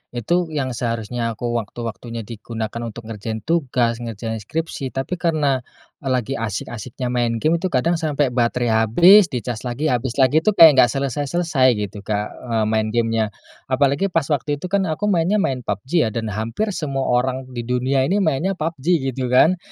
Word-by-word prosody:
Itu, 170 +10 0
yang 145 -5 -2
seharusnya 115 0 -2
aku 120 +2 -3
waktu-waktunya 115 +1 -6
di 110 +1 -9
gunakan 115 0 -5
untuk 115 +1 -8
ngerjain 110 0 -5
tugas, 125 -7 0
ngerjain 115 -1 -5
skripsi 155 +4 -4
tapi 135 +7 -3
karena, 150 -6 +1 0.5
lagi 130 0 -1
asyik-asyiknya 115 +3 -4
main 120 -2 0
game 160 +2 +3
itu 180 - -4
kadang 170 +2 +1
sampai 150 -4 0
baterai 120 0 +1 0.2
habis, 180 - +7
dicas 125 -4 -4
lagi 140 +6 -1
habis 125 0 -1
lagi, 130 +4 +5
itu 210 +6 +1
kayak 165 -4 +10
enggak 125 -2 +6
selesai-selesai 140 +1 +1
gitu 105 -1 -4
Kak, 105 0 -1
eee, 115 -3 -2
main 110 0 +1
game-nya. 115 -2 +1 0.4
Apalagi 140 +6 +2
pas 165 -5 0
waktu 145 0 0
itu 180 - -5
kan 195 -2 +1
aku 160 +5 -3
mainnya 175 +3 +2
main 135 -9 0
PUBG 120 - 0
ya. - - -1
Dan 110 -2 -2
hampir 115 - -2
semua 140 -7 -2
orang 130 +1 +1
di 120 -2 -5
dunia 130 +2 +1
ini 200 +5 +1
mainnya 160 +5 +1
PUBG, 160 -4 -4 0.3
gitu 130 0 -3
kan. 165 +8 +5
130 Hz, 175 wpm, -21 LUFS, 115-155 Hz, 0.5 s, kayak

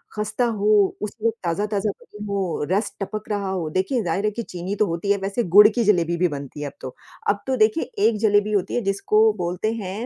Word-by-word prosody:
खस्ता 215 +3 -1
हो, 210 -3 +2
उसे 215 +2 -1
ताज़ा-ताज़ा 205 +4 -1
बनी 210 0 -11
हो, 195 -6 -2
रस 205 +2 0
टपक 215 +2 -5
रहा 200 -2 -2
हो 175 -5 -2
देखिए 190 - 0
ज़ाहिर 185 +3 -1
है 210 - +1
कि 235 +2 -5
चीनी 180 +2 -5
तो 210 - +2
होती 170 +4 -1
है 205 - +3
वैसे 200 +5 -1
गुड़ 210 - +11
की 230 +2 0
जलेबी 170 -5 +2
भी 180 +1 +3
बनती 145 -1 -7
है 145 - -3
अब - - -8
तो। 130 - -7 0.3
अब 200 0 0
तो 260 - +1
देखिए, 215 +7 +3 0.2
एक 230 - +3
जलेबी 210 -1 +2
होती 200 -3 0
है 245 - +1
जिसको 210 +2 +3
बोलते 180 +6 -1
हैं 210 +1 -5
205 Hz, 220 wpm, -23 LUFS, 185-215 Hz, 0.3 s, गुड़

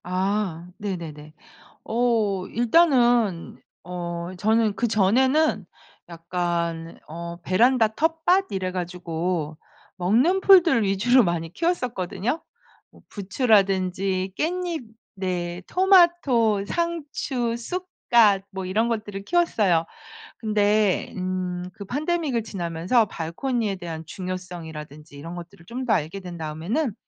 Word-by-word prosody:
아 185 -1 -1
네네네. 160 -6 -6 0.5
어 220 -5 +1
일단은 240 - +2 0.2
어 175 -1 -5
저는 220 +1 +2
그전에는 235 - +2 0.4
약간 170 -1 -3
어 170 +2 -6
베란다 225 +6 +3
텃밭 325 - +2
이래 185 -1 -2
가지고 175 -3 -3 0.4
먹는 235 - +2
풀들 350 - +6
위주로 225 +6 +4
많이 170 -2 -2
키웠었거든요. 250 - -2 0.5
뭐 - - -19
부추라든지 195 -3 +1
깻잎 345 -3 -2 0.3
네 180 -2 -3
토마토, 345 - +4
상추, 285 -8 -2
쑥갓 235 - +2
뭐 190 -1 -5
이런 215 +5 +1
것들을 210 -4 -4
키웠어요. 210 - +2 0.5
근데 210 -2 +1
음 185 0 -2 0.3
그 210 - -9
pandemic을 290 - -1
지나면서 180 +3 0
발코니에 205 +5 -2
대한 165 -3 -6
중요성이라든지 160 -5 -7
이런 165 +4 -8
것들을 170 -1 -11
좀 245 +7 -5
더 220 - +3
알게 165 +2 -1
된 180 -2 -8
다음에는 170 - -2
200 Hz, 250 characters per minute, -24 LUFS, 175-245 Hz, 0.5 s, 풀들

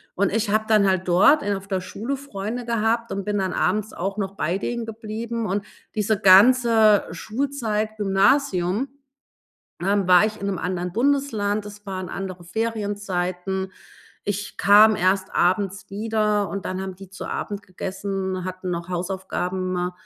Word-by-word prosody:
Und 200 0 +2
ich 225 -1 0
habe 215 +1 +2
dann 215 -2 +4
halt 190 -1 +1
dort 190 - +5
in 205 0 0
auf 195 0 -8
der 190 -2 0
Schule 230 +9 -4
Freunde 240 -3 -5
gehabt 230 0 0
und 195 - -3
bin 210 0 -1
dann 190 -1 -1
abends 210 +3 0
auch 195 +3 -3
noch 195 -1 -3
bei 170 +1 -1
denen 235 +2 -3
geblieben, 225 +1 -5
und 200 +1 -2 0.3
diese 210 -1 +1
ganze 220 +1 +6
Schulzeit, 220 -4 -2
Gymnasium, 200 +1 +2 0.9
ähm, 200 0 +1
war 180 +3 +7
ich 215 0 -5
in 200 - -3
'nem 195 -3 -2
anderen 180 -1 -3
Bundesland. 225 -4 +1
Es 205 0 -11
waren 185 -2 -4
andere 185 -2 -6
Ferienzeiten. 190 -3 -2 0.5
Ich 205 0 -4
kam 210 +3 +7
erst 190 +1 +1
abends 190 +2 +1
wieder, 210 0 0
und 200 - -4
dann 185 0 -3
haben 190 -1 -5
die 195 0 -12
zu 195 - -8
Abend 205 -1 -4
gegessen, 190 0 -4
hatten 185 0 -5
noch 170 0 -4
Hausaufgaben 185 0 -2
200 Hz, 155 wpm, -23 LUFS, 185-220 Hz, 0.9 s, war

